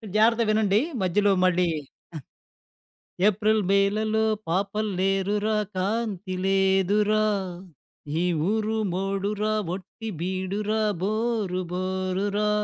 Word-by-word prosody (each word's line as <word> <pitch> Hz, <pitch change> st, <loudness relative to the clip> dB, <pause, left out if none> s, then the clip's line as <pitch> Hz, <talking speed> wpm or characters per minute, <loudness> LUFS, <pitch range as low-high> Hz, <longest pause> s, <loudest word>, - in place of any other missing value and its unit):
జాగ్రత్తగా 230 Hz, +1 st, +4 dB
వినండి, 215 Hz, -1 st, +3 dB, 0.2 s
మధ్యలో 200 Hz, +2 st, +2 dB
మళ్ళీ 180 Hz, -1 st, +3 dB
ఆహ్, 135 Hz, -, -18 dB, 1.4 s
ఏప్రిల్ 215 Hz, +1 st, +2 dB
మేలలో 215 Hz, +3 st, +2 dB, 0.2 s
పాపల్లేరురా 200 Hz, +2 st, 0 dB, 0.2 s
కాంతి 195 Hz, -1 st, -2 dB
లేదురా, 195 Hz, +2 st, +3 dB, 1.0 s
ఈ -, -, +1 dB, 0.3 s
ఊరు 220 Hz, 0 st, 0 dB, 0.2 s
మోడురా 200 Hz, +3 st, -1 dB, 0.2 s
ఒట్టి 200 Hz, +4 st, -8 dB
బీడురా 190 Hz, +4 st, -2 dB, 0.2 s
బోరు 215 Hz, -2 st, -1 dB
బోరు 185 Hz, +1 st, -1 dB
రా, 210 Hz, 0 st, +1 dB
200 Hz, 85 wpm, -25 LUFS, 190-215 Hz, 1.4 s, జాగ్రత్తగా